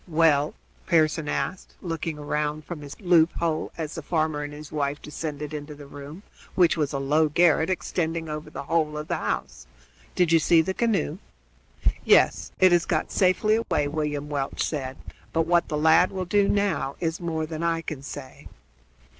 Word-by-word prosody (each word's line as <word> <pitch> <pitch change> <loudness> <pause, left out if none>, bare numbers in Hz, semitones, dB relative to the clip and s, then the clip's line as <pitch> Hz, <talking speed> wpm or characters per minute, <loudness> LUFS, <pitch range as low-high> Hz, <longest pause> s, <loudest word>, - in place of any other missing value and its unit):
"Well?" 155 -3 +3 0.3
Pearson 155 -2 +2
asked, 185 - -3
looking 165 -2 -4
round 150 +1 -2
from 170 -4 -7
his 145 -1 -10
loop 175 -4 +4
hole 165 -2 -1
as 160 -2 -4
the - - -5
farmer 155 -3 0
and 145 0 -5
his 150 0 -10
wife 145 -1 -1
descended 150 -1 -6
into 150 0 -6
the 145 0 -11
room, 145 +6 -10 0.3
which 175 -3 +4
was 150 -4 -1
a 140 - -2
low 150 +3 +2
garret 160 +1 +3
extending 165 -2 -2
over 150 0 -5
the - - -6
whole 155 0 0
of 150 0 -5
the - - 0
house. - - -4 0.5
"Do 180 - +4
you 165 -1 +4
see 165 0 +4
the 190 - -2
canoe?" 225 - 0 0.8
"Yes, - - +4
it 185 -1 +6
has 175 -1 +4
got 155 - 0
safely 210 +3 +3
away," 150 -10 0
William 150 -1 -2
Welch 140 -2 -2
said; 135 -4 -3 0.4
"but 165 0 +2
what 175 0 +3
the 150 - -2
lad 160 +4 +5
will 185 -1 -4
do 200 +2 +2
now 200 -9 0
is 165 +1 -2
more 160 -2 -2
than 155 0 -6
I 165 -1 0
can 155 -4 -5
say." 140 -1 -9
155 Hz, 180 wpm, -25 LUFS, 150-170 Hz, 0.8 s, it